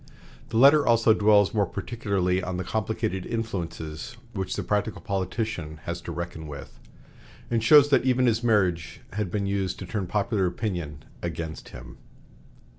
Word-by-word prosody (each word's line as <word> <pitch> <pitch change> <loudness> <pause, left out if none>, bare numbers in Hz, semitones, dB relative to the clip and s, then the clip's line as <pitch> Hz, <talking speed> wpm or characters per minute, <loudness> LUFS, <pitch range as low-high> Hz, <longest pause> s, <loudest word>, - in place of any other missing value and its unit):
The 110 - -2
letter 140 +4 +7
also 115 -2 +4
dwells 105 -2 +4
more 105 -3 +2
particularly 100 -6 -1
on 90 0 -4
the 90 - -2
complicated 110 -1 -2
influences 85 -5 -5 0.2
which 95 -3 -3
the - - -3
practical 105 +1 -1
politician 95 -4 -3
has 85 0 -4
to 85 - -6
reckon 85 -1 -5
with, 70 -4 -10 0.7
and 115 -1 +1
shows 145 +3 +7
that 140 - +4
even 130 0 +3
his 115 0 +2
marriage 95 -8 +1
had 105 -2 -2
been 100 +2 -1
used 100 -2 -1
to 95 - -7
turn 95 0 -3
popular 105 -1 0
opinion 85 -7 -4 0.2
against 80 -2 -5
him. 60 0 -11
100 Hz, 155 wpm, -26 LUFS, 85-110 Hz, 0.7 s, letter